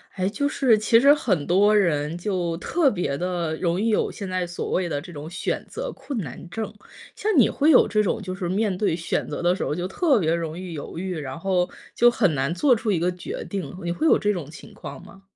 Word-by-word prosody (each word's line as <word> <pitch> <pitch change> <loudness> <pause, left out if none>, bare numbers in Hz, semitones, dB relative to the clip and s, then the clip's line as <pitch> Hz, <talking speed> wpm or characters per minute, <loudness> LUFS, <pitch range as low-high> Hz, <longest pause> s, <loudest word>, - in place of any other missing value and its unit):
哎， 185 0 0
就 285 +7 -1
是 250 -7 +3
其 225 +2 +5
实 280 +3 +7
很 190 - 0
多 205 +4 +4
人， 165 -5 +1
就 175 -3 -2
特 315 - +2
别 175 - -2
的 175 -2 -2
容 170 +1 0
易 225 +2 +1
有 215 - +1
现 200 - -6
在 185 -1 -2
所 175 - -5
谓 180 -2 0
的 145 - -1
这 175 +4 -11
种 150 +1 -7
选 175 - -3
择 - - -5
困 275 - -6
难 165 - -7
症， 220 +3 -5 0.4
像 435 - -1
你 245 - +6
会 295 - +2
有 285 - +7
这 215 0 +2
种 210 +2 0
就 185 -2 -5
是， 185 -2 -4
面 200 +1 0
对 195 -5 +1
选 165 0 -2
择 - - -4
的 175 +1 +3
时 - - -3
候 150 - -1
就 180 +2 -3
特 275 - +2
别 165 -3 +1
容 165 -1 -3
易 180 -1 -6
犹 150 +1 -7
豫， 185 0 -3
然 150 +2 -6
后 180 0 +1 0.2
就 240 - +5
很 190 -8 +2
难 135 +2 0
做 250 +8 +4
出 220 -1 -1
一 190 - +2
个 175 +2 +1
决 180 0 -6
定， 195 -1 -5
你 170 - -1
会 310 - 0
有 - - +6
这 210 0 +1
种 165 -7 -6
情 155 - -12
况 - - -9
吗？ 195 +1 -15
185 Hz, 265 characters per minute, -24 LUFS, 170-215 Hz, 0.4 s, 实